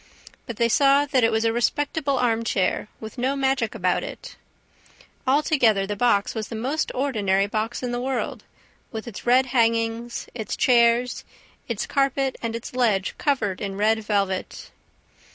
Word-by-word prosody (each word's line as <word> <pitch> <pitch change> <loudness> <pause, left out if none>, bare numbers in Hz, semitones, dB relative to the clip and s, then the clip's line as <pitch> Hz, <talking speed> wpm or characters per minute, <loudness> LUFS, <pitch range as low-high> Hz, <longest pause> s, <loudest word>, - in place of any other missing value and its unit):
But 235 -4 -6
they 235 - +3
saw 275 +4 +4
that 270 -4 +1
it 225 - +4
was 220 +1 +1
a 225 - +2
respectable 280 +3 0
arm 230 -2 +1
chair, 200 -2 0
with 220 +3 -9
no 260 +3 0
magic 265 -5 0
about 180 -4 +1
it. - - -8 0.9
Altogether, 260 -8 +3
the 205 +1 -3
box 205 -2 +2
was 220 -2 -4
the 230 - -7
most 265 +8 -2
ordinary 205 -8 +1
box 220 +4 -3
in 245 - -2
the 245 0 -2
world, 260 -1 -3 0.5
with 220 0 -6
its 235 +1 -8
red 255 +2 +5
hangings, 230 0 0
its 220 -4 -4
chairs, 240 0 +3 0.4
its - - -2
carpet 275 -1 0
and 230 -1 -3
its 230 - -7
ledge 215 -6 +1
covered 230 -10 0
in 195 -2 -3
red 215 +2 +2
velvet. 200 -3 -2
235 Hz, 160 wpm, -24 LUFS, 215-265 Hz, 0.9 s, red